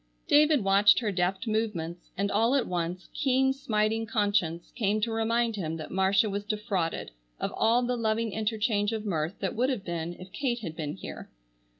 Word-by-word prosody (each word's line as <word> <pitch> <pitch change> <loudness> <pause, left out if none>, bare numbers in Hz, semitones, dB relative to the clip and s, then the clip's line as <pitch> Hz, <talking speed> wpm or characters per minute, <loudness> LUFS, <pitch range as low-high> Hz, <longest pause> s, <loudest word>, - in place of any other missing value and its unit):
David 295 -4 +5
watched 195 +1 +5
her 220 -4 0
deft 190 +3 -1
movements 205 -7 -2
and 200 +1 0
all 230 +6 +3
at 270 - +2
once 175 +1 -3
keen 265 -1 +2
smiting 220 -3 0
conscience 205 -6 0
came 215 -2 +1
to 230 +2 0
remind 230 +1 +1
him 165 -5 -3
that 155 - -7
Marcia 190 +3 +3
was 200 0 -3
defrauded 205 - -2 0.3
of - - -2
all 235 +3 +3
the 250 +1 0
loving 225 -1 0
interchange 215 0 0
of 220 -1 -3
mirth 165 -2 -1
that 195 - -2
would 250 +4 +2
have 235 -7 -2
been 170 0 -3
if 185 +1 -12
Kate 240 +2 -2
had 165 -7 -6
been 150 -2 -4
here. - - -8
210 Hz, 185 wpm, -28 LUFS, 185-230 Hz, 0.3 s, David